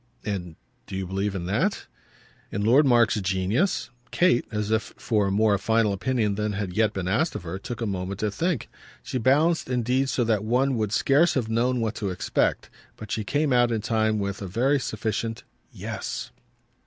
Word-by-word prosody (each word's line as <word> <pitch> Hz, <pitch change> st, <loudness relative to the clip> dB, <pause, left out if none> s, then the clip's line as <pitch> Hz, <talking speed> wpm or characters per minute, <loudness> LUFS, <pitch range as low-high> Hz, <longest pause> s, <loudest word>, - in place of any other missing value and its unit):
"And 90 Hz, -6 st, -4 dB, 0.3 s
do -, -, -6 dB
you 95 Hz, 0 st, -2 dB
believe 95 Hz, +2 st, -2 dB
in 90 Hz, -2 st, -3 dB
that?" 135 Hz, -, 0 dB, 0.7 s
"In 100 Hz, -, -2 dB
Lord 135 Hz, +6 st, +5 dB
Mark's 120 Hz, -4 st, +4 dB
genius?" 95 Hz, -, 0 dB, 0.2 s
Kate, 175 Hz, -9 st, +3 dB
as 105 Hz, -1 st, -2 dB
if 110 Hz, 0 st, -1 dB
for 105 Hz, -4 st, +1 dB
a -, -, 0 dB
more 105 Hz, 0 st, +3 dB
final 110 Hz, 0 st, +2 dB
opinion 110 Hz, 0 st, 0 dB
than 105 Hz, +1 st, -2 dB
had 100 Hz, -2 st, -3 dB
yet 110 Hz, +1 st, +2 dB
been 95 Hz, -3 st, -4 dB
asked 155 Hz, -, +1 dB
of -, -, -5 dB
her, 85 Hz, +3 st, -5 dB
took 120 Hz, +4 st, -6 dB
a -, -, 0 dB
moment 95 Hz, -1 st, -3 dB
to 105 Hz, -1 st, 0 dB
think. 165 Hz, -, -1 dB, 0.4 s
She 130 Hz, -, -3 dB
balanced 150 Hz, +6 st, +2 dB
indeed 125 Hz, +2 st, +1 dB
so 125 Hz, -, +1 dB
that 110 Hz, -3 st, +1 dB
one 125 Hz, +4 st, +2 dB
would 110 Hz, -3 st, -1 dB
scarce 145 Hz, +9 st, +3 dB
have 120 Hz, -5 st, -1 dB
known 120 Hz, +2 st, +1 dB
what 110 Hz, -1 st, -1 dB
to 100 Hz, -, -2 dB
expect; 90 Hz, -, -1 dB, 0.3 s
but 110 Hz, -, -9 dB
she 110 Hz, -, -1 dB
came 145 Hz, +4 st, +1 dB
out 120 Hz, -1 st, +4 dB
in 110 Hz, -2 st, 0 dB
time 110 Hz, -1 st, +1 dB
with 100 Hz, -1 st, -3 dB
a 100 Hz, -, -4 dB
very 130 Hz, +9 st, +2 dB
sufficient 115 Hz, -2 st, -3 dB, 0.3 s
"Yes!" -, -, -5 dB
110 Hz, 190 wpm, -25 LUFS, 100-125 Hz, 0.7 s, Lord